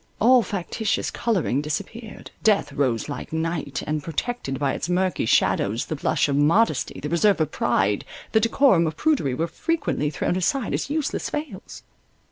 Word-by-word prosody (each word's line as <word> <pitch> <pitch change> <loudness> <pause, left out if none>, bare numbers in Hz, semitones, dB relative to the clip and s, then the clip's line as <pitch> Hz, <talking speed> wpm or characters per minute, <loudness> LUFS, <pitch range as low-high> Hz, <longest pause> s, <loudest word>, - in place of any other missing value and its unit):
All 250 +3 +6
factitious 205 +1 -2
colouring 185 - 0
disappeared—death 205 +1 -2
rose 130 -6 0
like 145 - -6
night, 160 -3 -2
and, 155 0 -2
protected 165 - -3
by 140 0 0
its - - -4
murky 180 -7 0
shadows 100 +3 +2
the 155 - -4
blush 145 - +1
of 140 - 0
modesty, 155 - +2
the 150 - -4
reserve 180 +4 +3
of 155 -1 0
pride, 100 -4 +1 0.3
the 220 - +4
decorum 230 - +3
of 155 0 -4
prudery 255 - +1
were 165 - 0
frequently 290 - -1
thrown 155 +4 -1
aside 220 +7 0
as - - -2
useless 305 0 -2
veils. 295 -11 -6
165 Hz, 155 wpm, -24 LUFS, 145-225 Hz, 0.3 s, All